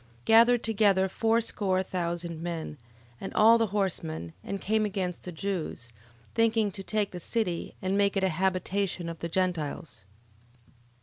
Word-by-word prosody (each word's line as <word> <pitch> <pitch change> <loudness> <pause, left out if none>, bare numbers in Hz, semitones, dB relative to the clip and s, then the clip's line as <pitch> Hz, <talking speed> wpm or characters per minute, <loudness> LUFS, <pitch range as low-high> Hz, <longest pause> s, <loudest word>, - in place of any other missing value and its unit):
Gathered 230 +2 +6
together 200 -4 +3
fourscore 210 -3 +1
thousand 170 -2 -3
men, 165 -4 -5 0.4
and 195 - -5
all 225 +2 +6
the 225 - +2
horsemen, 85 - -2
and 200 - -4
came 215 +3 +1
against 190 -4 -3
the 180 - -5
Jews, 160 -9 -4 0.4
thinking 225 -2 +2
to 195 - -8
take 210 +1 -1
the 180 - -6
city, 180 -3 -2
and 190 +1 0
make 200 0 +2
it 195 - +1
a 190 - +3
habitation 185 +1 -1
of 165 - -7
the 170 - -4
Gentiles: 165 - -2 0.6
11:3. - - -29
190 Hz, 150 wpm, -28 LUFS, 170-210 Hz, 0.6 s, Gathered